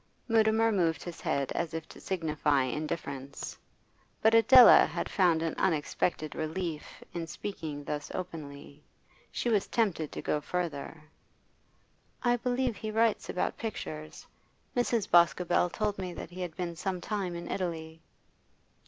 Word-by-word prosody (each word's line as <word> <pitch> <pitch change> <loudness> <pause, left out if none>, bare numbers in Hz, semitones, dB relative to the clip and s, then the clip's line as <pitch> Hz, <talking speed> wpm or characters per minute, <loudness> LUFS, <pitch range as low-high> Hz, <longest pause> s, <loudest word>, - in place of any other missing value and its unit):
Mutimer 225 0 +4
moved 170 -5 +1
his 175 -2 -8
head 140 -1 -1
as 170 -1 -2
if 160 -1 -5
to - - -12
signify 155 -6 +1
indifference. 140 0 -4 0.6
But 220 +1 +4
Adela 235 +2 +9
had 170 +2 -3
found 170 -4 +3
an 165 - -1
unexpected 155 -2 0
relief 160 0 -4
in 170 -1 -4
speaking 160 -4 -6
thus 145 +1 -4
openly; 150 -5 -7 0.5
she - - -2
was 215 -4 +2
tempted 190 -10 0
to - - -5
go 150 - 0
further. 160 -2 -4 1.2
'I 245 -1 +3
believe 250 0 0
he 220 - -5
writes 225 0 +1
about 180 - -1
pictures. 155 -8 -6 0.5
Mrs. 240 -4 +1
Boscobel 175 +1 +4
told 205 +2 -2
me 180 -2 -4
that - - -8
he 185 +1 -7
had 175 -3 -4
been 175 -2 -4
some 185 +1 -3
time 190 -3 -3
in 170 - -6
Italy. 160 -3 -4
175 Hz, 140 wpm, -30 LUFS, 155-205 Hz, 1.2 s, Adela